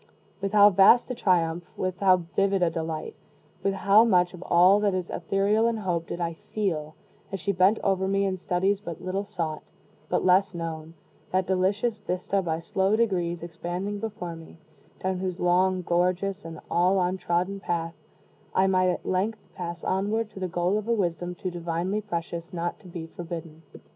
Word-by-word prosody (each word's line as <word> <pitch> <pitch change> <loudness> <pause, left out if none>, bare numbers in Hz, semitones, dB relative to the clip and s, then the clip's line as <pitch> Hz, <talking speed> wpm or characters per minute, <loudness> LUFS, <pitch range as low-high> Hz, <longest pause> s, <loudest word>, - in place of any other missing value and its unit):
With 195 +1 -2
how 205 0 +8
vast 200 +7 +6
a - - 0
triumph 175 -6 +1
with 185 -1 -2
how 185 -3 +4
vivid 195 -1 +2
a 170 - +2
delight 160 -1 -4 0.5
with 195 0 0
how 200 +3 +5
much 180 -6 +3
of 180 - -10
all 185 +3 +5
that 205 -2 +1
is 180 -2 -3
ethereal 200 +5 +1
in 230 -1 0
hope 175 -5 -2
did - - -5
I 170 -1 -1
feel, 160 -4 -3 0.4
as 195 - -3
she 200 - 0
bent 190 +3 +4
over 190 -1 +1
me 195 +1 +1
in 190 -1 -1
studies 190 +3 0
but 170 -4 -7
little 185 +2 -2
sought 165 -7 -4 0.5
but - - 0
less 185 0 +4
known, 165 -1 -5 0.4
that 185 0 +1
delicious 200 +5 0
vista 195 0 -1
by 165 -3 -1
slow 190 +5 +1
degrees 175 -7 0
expanding 175 +4 -4
before 180 -6 -5
me, 165 0 -13 0.5
down 185 -1 -1
whose 185 -1 -3
long, 185 +1 +2
gorgeous, 180 +3 0
and 165 -1 -7
all 185 +3 +3
untrodden 180 +1 0
path, 170 -3 -2 0.6
I 190 - +4
might 185 -1 +3
at 180 - -2
length 195 +1 -2
pass 170 -1 -6
onward 210 +3 0
to 200 - -10
the 185 - -2
goal 180 +4 0
of 215 - -8
a 235 - +2
wisdom 175 -4 -1
too 185 +1 -4
divinely 175 +4 -2
precious 170 -3 -5
not 175 0 -3
to 195 - -15
be 170 -2 -6
forbidden. 165 -1 -8
185 Hz, 180 wpm, -26 LUFS, 170-195 Hz, 0.6 s, how